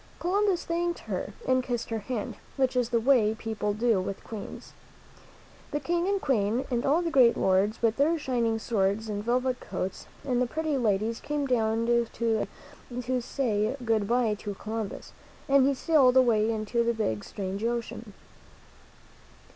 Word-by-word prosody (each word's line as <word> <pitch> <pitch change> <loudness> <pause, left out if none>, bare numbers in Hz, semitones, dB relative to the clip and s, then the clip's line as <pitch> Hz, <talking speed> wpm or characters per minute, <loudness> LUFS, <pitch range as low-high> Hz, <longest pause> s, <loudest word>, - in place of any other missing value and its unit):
Columbus 385 0 +1
thanked 345 +1 -1
her - - -4 0.2
and 255 0 +3
kissed 245 -2 -3
her 225 - -1
hand, 215 0 -4 0.2
which 260 -1 +1
is 245 -2 +1
the 235 -1 +2
way 225 -3 +3
people 220 -2 -2
do 220 -1 +2
with 195 +1 -5
Queens. 215 -3 -8 1.0
The 295 - -2
King 345 +3 0
and 400 0 +1
Queen 240 - +1
and 240 -1 0
all 315 +6 +3
the 335 - -1
great 250 -5 +5
lords, 195 +5 +1
with 225 -1 +2
their 310 +4 +3
shining 240 -6 0
swords 215 -1 0
and 205 -1 -3
velvet 250 +2 0
coats, 185 - -5 0.2
and 250 -2 +1
the 250 - +2
pretty 315 +2 -1
ladies 225 -2 0
came 295 -1 -2
down 225 -3 +1
to 235 0 +2
sea 225 -2 0 0.5
to 250 0 -1
say 230 -1 -1
good 220 -3 +1
by 235 -2 +2
to 205 -1 -5
Columbus, 215 0 -5 0.3
and 275 -1 +5
he 280 - +2
sailed 265 -3 +4
away 225 -4 +4
into 225 +1 0
the 235 0 0
big, 110 - -1
strange 195 +1 -5
ocean. 235 -2 -3
235 Hz, 165 wpm, -28 LUFS, 215-265 Hz, 1.0 s, great